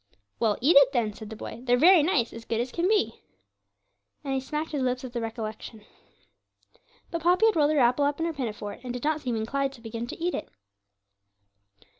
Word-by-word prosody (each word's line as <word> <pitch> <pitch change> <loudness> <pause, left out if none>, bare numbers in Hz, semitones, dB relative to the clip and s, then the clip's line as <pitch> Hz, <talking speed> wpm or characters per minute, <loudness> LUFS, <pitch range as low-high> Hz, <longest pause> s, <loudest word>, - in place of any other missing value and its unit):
'Well, 220 -3 +1
eat 295 +7 +4
it 275 -1 +7
then,' 225 -4 0
said 215 0 -10
the 220 - -7
boy 230 - -8
'they're 245 -1 +2
very 345 +5 +7
nice 290 -7 +1
as 230 - -9
good 230 0 -2
as 245 +1 -2
can 345 +5 0
be,' 425 0 +1 1.0
and 275 -2 -2
he 265 - +1
smacked 300 +4 -4
his 290 -3 -2
lips 255 0 -1
at 245 - -9
the 240 - -2
recollection. 220 -1 -6 1.3
But 335 -1 -3
Poppy 360 +6 +4
had 445 - +4
rolled 295 -2 +3
her 310 - +1
apple 250 +2 +3
up 290 +1 -1
in 325 - 0
her 335 - -2
pinafore, 215 -7 -5
and 245 -1 -5
did 245 - -6
not 310 0 0
seem 245 -4 -2
inclined 270 +5 -1
to 245 - -15
begin 230 +1 -5
to - - -7
eat 350 +2 -1
it. - - -4
255 Hz, 215 wpm, -27 LUFS, 230-305 Hz, 1.3 s, it